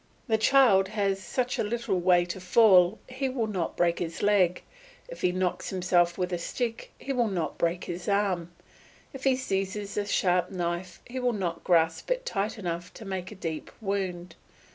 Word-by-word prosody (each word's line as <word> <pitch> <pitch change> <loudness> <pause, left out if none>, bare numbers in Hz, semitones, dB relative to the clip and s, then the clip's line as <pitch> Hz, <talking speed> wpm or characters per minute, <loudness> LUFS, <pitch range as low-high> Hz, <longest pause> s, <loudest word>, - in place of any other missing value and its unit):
The 220 -2 +2
child 220 -6 +5
has 195 -2 -1
such 250 +6 -2
a - - +2
little 215 -3 -1
way 175 0 +4
to 175 +2 -6
fall 185 0 +5
he 260 +1 -2
will 250 -3 -1
not 190 -6 -3
break 170 -1 +2
his 170 +1 -4
leg; 190 -4 +3 0.4
if - - -10
he 180 - +2
knocks 185 0 -1
himself 175 -2 +2
with 180 -1 -2
a 175 - -1
stick 230 +6 -4
he 275 - -4
will 240 -3 +2
not 185 -5 -3
break 170 +1 0
his 175 +1 -6
arm; 195 -4 +1 0.6
if 270 0 -8
he 265 -1 +4
seizes 200 -4 -3
a 205 - 0
sharp 180 -3 +2
knife 175 0 -4
he 255 +2 -5
will 250 -1 +1
not 175 -5 -3
grasp 165 - +2
it - - -1
tight 210 - -2
enough 175 -3 -4
to 220 - -10
make 190 -1 -4
a - - -9
deep 165 -4 -5
wound. 185 -5 -3
190 Hz, 185 wpm, -28 LUFS, 175-220 Hz, 0.6 s, child